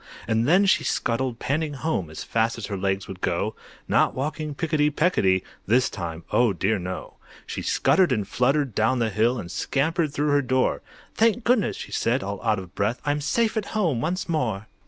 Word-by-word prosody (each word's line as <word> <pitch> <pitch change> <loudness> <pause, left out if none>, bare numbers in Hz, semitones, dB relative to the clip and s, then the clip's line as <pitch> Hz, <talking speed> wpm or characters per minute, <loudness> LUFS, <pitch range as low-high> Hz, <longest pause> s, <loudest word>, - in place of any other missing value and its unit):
And 115 +1 +1
then 185 +6 +5
she 190 - +3
scuttled 120 0 -1
panting 150 +3 -1
home 135 - -2
As 80 - -7
fast 115 0 0
as 115 - -5
her 100 - -4
legs 95 0 -1
would 95 -1 -9
go, - - -1 0.3
Not - - +3
walking 150 +2 -3
picketty 155 -2 +1
pecketty 120 - +2 0.2
This 125 +5 +3
time, 85 -3 -5
oh 120 -4 +3
dear 105 +3 0
no! 90 +1 -6 0.3
She - - -5
scuttered 185 -5 +3
and 105 -6 0
fluttered 135 +2 +1
down 110 +6 +2
the 115 -2 0
hill, 115 +5 +2
And 90 -6 -6
scampered 155 - 0
through 145 +1 0
her 145 0 +4
door. 130 -1 +1 0.3
"Thank 230 +1 +2
goodness!" 235 -5 +2
she - - -8
said, 125 +3 0
all 100 0 -5
out 110 -2 +2
of 95 -2 -8
breath, 105 +5 -1
"I'm 145 0 0
safe 220 +11 +1
at 215 -2 -1
home 160 - +1
once 180 +6 -2
more!" 120 - -1
130 Hz, 195 wpm, -25 LUFS, 105-155 Hz, 0.3 s, then